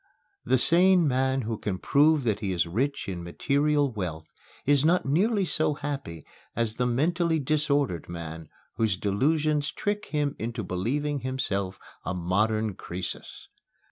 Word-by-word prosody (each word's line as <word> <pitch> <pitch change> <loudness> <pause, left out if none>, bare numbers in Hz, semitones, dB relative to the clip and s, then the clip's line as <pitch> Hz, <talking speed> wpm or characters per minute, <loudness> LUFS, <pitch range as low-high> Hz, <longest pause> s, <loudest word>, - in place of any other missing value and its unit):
The 130 +2 +3
sane 175 +4 +5
man 130 0 +1
who 110 -2 -4
can 100 -3 -2
prove 150 +6 +3
that 110 -4 0
he 100 -3 -2
is 90 -2 +1
rich 130 +12 -2
in 90 -3 -4
material 140 - +1
wealth 85 -8 -4 0.4
is 145 0 +4
not 170 +3 +3
nearly 195 - +2
so 155 -3 +1
happy 135 - -5 0.3
as 115 -2 -1
the 125 - +1
mentally 165 +6 +1
disordered 145 - 0
man 80 -2 -7 0.3
whose 110 -4 +1
delusions 145 +9 +1
trick 205 0 -2
him 145 -2 -1
into 115 0 -3
believing 140 +11 -1
himself 100 -8 -2 0.3
a 90 - -3
modern 105 +5 0
Croesus. 90 0 -7
130 Hz, 140 wpm, -27 LUFS, 100-150 Hz, 0.4 s, sane